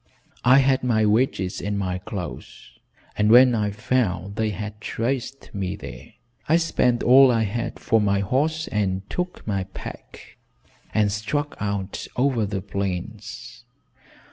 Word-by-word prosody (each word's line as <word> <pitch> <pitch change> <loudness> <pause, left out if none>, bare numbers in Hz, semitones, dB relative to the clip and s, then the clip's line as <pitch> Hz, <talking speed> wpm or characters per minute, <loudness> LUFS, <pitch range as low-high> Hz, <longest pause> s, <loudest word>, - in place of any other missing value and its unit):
I 130 +2 +7
had 135 -1 +3
my 110 -4 +2
wages 105 -4 +1
and 105 0 -2
my 90 -2 -2
clothes, 90 - -8 0.4
and 105 0 +2
when 125 +2 +8
I 105 -2 +1
found 100 -3 -1
they 110 0 0
had 105 +1 -6
traced 130 +4 -3
me 95 -2 -3
there, 105 - -10 0.4
I 160 - +6
spent 125 -7 +1
all 130 +2 +7
I 115 -2 +2
had 115 +3 -3
for 115 -2 +2
my 100 -1 +2
horse 155 +9 0
and 95 -2 -1
took 180 0 -4
my 100 -3 -1
pack - - -10 0.5
and 105 -2 +2
struck 145 +8 -2
out 100 -1 -3
over 125 -5 +1
the 100 -2 -4
plains." 110 +6 -5
110 Hz, 140 wpm, -24 LUFS, 100-125 Hz, 0.5 s, when